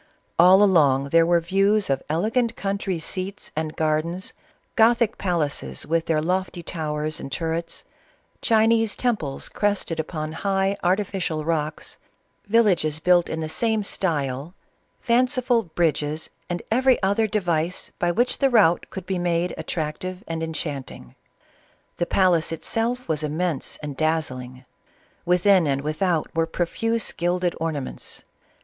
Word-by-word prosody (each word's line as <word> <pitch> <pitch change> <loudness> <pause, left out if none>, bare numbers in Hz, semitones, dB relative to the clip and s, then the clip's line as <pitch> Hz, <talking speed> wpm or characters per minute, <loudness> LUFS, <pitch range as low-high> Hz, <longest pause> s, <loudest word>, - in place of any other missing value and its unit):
All 185 +4 +8
along 140 -8 +4
there 165 +2 +4
were 175 0 +4
views 195 +4 +2
of 135 -1 0
elegant 220 +9 0
country 195 -2 -2
seats 185 +4 -5
and 155 0 -3
gardens, 160 +4 -1 0.4
gothic 230 -1 +3
palaces 170 -6 -1
with 165 +2 0
their 160 -2 +2
lofty 180 0 -2
towers 155 -1 -3
and 135 - -7
turrets, 165 +2 -3 0.6
Chinese 225 -1 +3
temples 210 - -2
crested 200 -5 -1
upon 155 -1 -3
high 195 +3 0
artificial 180 -4 0
rocks, 155 -2 -2 0.5
villages 185 -9 +2
built 175 +1 +3
in 160 - -3
the - - -2
sam^t) 215 +6 -1
lev 145 -2 -1 0.5
fanciful 250 0 +2
bridges, 155 -2 0 0.2
and 175 -1 -3
every 255 +2 +4
other 205 +3 +2
device 175 -5 -1
by 175 - +1
which 240 +8 0
the 275 - +4
route 205 -9 +4
could 190 -2 -7
be 190 -1 -2
made 175 0 0
attractive 180 +3 -4
and 165 0 -3
enchanting. 145 - -5 0.8
The 175 - -1
palace 175 -4 +2
itself 230 +9 -2
was 155 -1 -1
immense 155 0 -2
and 145 -2 -5
dazzling; 130 -5 -2 0.6
within 180 0 +4
and 140 -1 0
without 160 +2 -1
were 165 0 +1
pro 175 +2 -1
fuse 225 +5 -1
gilded 175 +1 0
ornaments. 155 -5 -5
175 Hz, 130 wpm, -24 LUFS, 155-200 Hz, 0.8 s, All